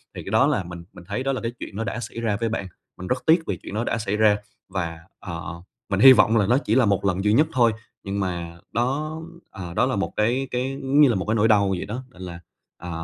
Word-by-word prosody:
thì - - -6
cái - - -7
đó - - +4
là 95 - +1
mình 85 0 -9
mình 90 - -12
thấy 100 +6 -3
đó 135 - 0
là 130 - -3
cái 115 - -2
chuyện - - -8
nó 110 - -2
đã 110 +2 -3
xảy 115 - -6
ra 110 -3 0
với 115 - 0
bạn. 105 -3 -3 0.3
Mình 90 - -7
rất 130 +5 -1
tiếc 165 +1 +5
vì 95 - -2
chuyện - - -10
đó 110 +2 -1
đã 115 - -1
xảy 105 -2 -2
ra 105 -1 +4 0.3
và, 85 -4 -3 0.2
ờ, 85 -1 -7 0.3
mình 95 -1 0
hy 130 +4 +10
vọng 110 0 +4
là 105 - +3
nó 120 +4 +4
chỉ 115 -6 0
là 130 -2 +5
một 100 -1 +1
lần 95 0 0
duy 105 0 +3
nhất 150 +7 +4
thôi, 120 -3 +4 0.3
nhưng 100 +1 -3
mà 85 -3 -4
đó, 145 +7 -1 0.3
ờ, 90 -3 -7
đó 110 - +2
là 130 - 0
một 100 - -2
cái 120 +5 +1
cái, 130 +2 -2
giống 135 +2 +3
như 145 - +7
là, 120 - +2
một 95 - -2
cái 110 - 0
nỗi 110 0 +3
đau 100 -3 +4
vậy 95 -2 -2
đó, 120 +5 -5
nên 95 - -15
là, 85 -2 -7 0.4
à, 90 - -8
105 Hz, 280 wpm, -24 LUFS, 95-125 Hz, 0.4 s, hy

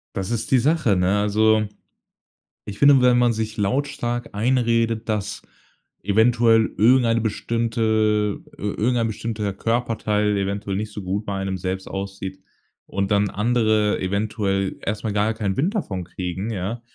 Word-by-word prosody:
Das 95 +3 -3
ist 115 - -2
die 130 - +5
Sache, 140 - +2
ne? 95 +3 +2
Also, 110 +1 +3 1.0
ich 105 -1 -8
finde, 140 -2 +6
wenn 125 -1 +5
man 120 -1 +3
sich 110 0 -4
lautstark 120 +2 -1
einredet, 115 -1 +1
dass 105 -2 -2 0.6
eventuell 115 +2 +3
irgendeine 115 0 +4
bestimmte 110 -2 0 0.2
ir 105 0 -4
irgendein 120 0 +1
bestimmter 105 -2 -3
Körperteil 110 -3 0
eventuell 100 0 -2
nicht 105 +2 -3
so 105 - -6
gut 100 +3 -3
bei 100 - -3
einem 95 -1 -2
selbst 95 +1 -4
aussieht 95 -1 -6 0.5
und 100 0 -2
dann 100 0 +2
andere 110 -1 +1
eventuell 100 0 -1
erst 105 +1 -2
mal 105 - -1
gar 105 +2 +1
keinen 105 -3 -2
Wind 180 +11 0
davon 95 - -3
kriegen, 95 +4 -5
ja, 105 +4 -4
110 Hz, 145 wpm, -22 LUFS, 100-115 Hz, 1.0 s, finde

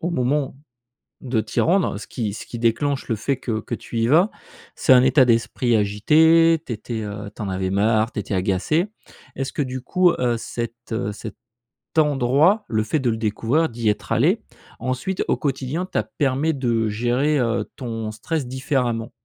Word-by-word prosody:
au 170 - -2
moment 135 -1 0 0.7
de 125 -4 -1
t'y 110 0 -2
rendre. 180 - +2
Ce 100 - -9
qui 110 -5 -3
ce - - -7
qui 120 - -7
déclenche 130 +5 0
le 115 - +1
fait 135 +6 -1
que 115 -3 -3
que 120 - -5
tu 115 - -6
y 115 - +2
vas, 170 - +4 0.4
c'est - - +3
un 125 -1 +7
état 130 0 +5
d'esprit 115 0 +2
agité. 160 +11 +4
Tu - - -4
étais, 110 0 -5
heu, 105 0 -6
tu - - -7
en 100 - -3
avais 95 0 -2
marre, 110 +3 +2
tu - - -6
étais 100 0 -4
agacé. 100 - +1 0.5
Est-ce 135 0 -3
que, 145 - -1
du 130 -1 -4
coup, 180 +6 +3
heu, 120 -2 +1
cet, 115 0 -5 0.2
heu, 105 -2 -2
cet 110 +1 -8 0.6
endroit, 150 - +3
le 110 -1 0
fait 145 +8 0
de 125 - 0
le 110 - -2
découvrir, 115 +8 0
d'y 115 -1 -1
être 105 0 -3
allé, 180 - +3 0.4
ensuite, 130 +9 -2
au - - +2
quotidien, 140 +4 -2
t'a 110 - -1
permet 135 +7 0
de 120 -5 0
gérer, 125 +7 +1
heu, 120 -1 0
ton 115 -4 -4
stress 135 +6 -3
différemment? 125 -3 -1
120 Hz, 185 wpm, -22 LUFS, 110-145 Hz, 0.7 s, un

